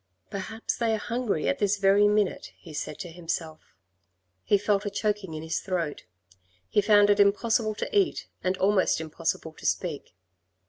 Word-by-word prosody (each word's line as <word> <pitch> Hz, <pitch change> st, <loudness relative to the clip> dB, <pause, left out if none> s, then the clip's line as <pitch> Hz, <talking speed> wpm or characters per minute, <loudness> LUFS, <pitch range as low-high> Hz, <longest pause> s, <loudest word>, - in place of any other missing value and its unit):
" 95 Hz, 0 st, -46 dB
Perhaps 220 Hz, +3 st, -4 dB
they 225 Hz, -2 st, +1 dB
are -, -, -2 dB
hungry 230 Hz, -6 st, -2 dB
at -, -, 0 dB
this 205 Hz, 0 st, +2 dB
very 200 Hz, +1 st, +5 dB
minute," 210 Hz, -2 st, 0 dB
he 160 Hz, -, -12 dB
said -, -, -4 dB
to 180 Hz, -4 st, -7 dB
himself. 165 Hz, -, -5 dB, 0.7 s
He 205 Hz, -, +3 dB
felt 205 Hz, 0 st, +1 dB
a 205 Hz, -, -2 dB
choking 205 Hz, -4 st, -2 dB
in 155 Hz, -, -6 dB
his 160 Hz, -, -2 dB
throat. 175 Hz, -6 st, -3 dB, 0.6 s
He 205 Hz, -, +2 dB
found 205 Hz, 0 st, +5 dB
it 205 Hz, -, +2 dB
impossible 215 Hz, +2 st, +3 dB
to 425 Hz, -, -4 dB
eat 395 Hz, -3 st, +2 dB, 0.2 s
and 185 Hz, 0 st, 0 dB
almost 195 Hz, -2 st, +2 dB
impossible 160 Hz, 0 st, -3 dB
to -, -, -13 dB
speak. 155 Hz, -, -2 dB
200 Hz, 175 wpm, -27 LUFS, 165-210 Hz, 0.7 s, very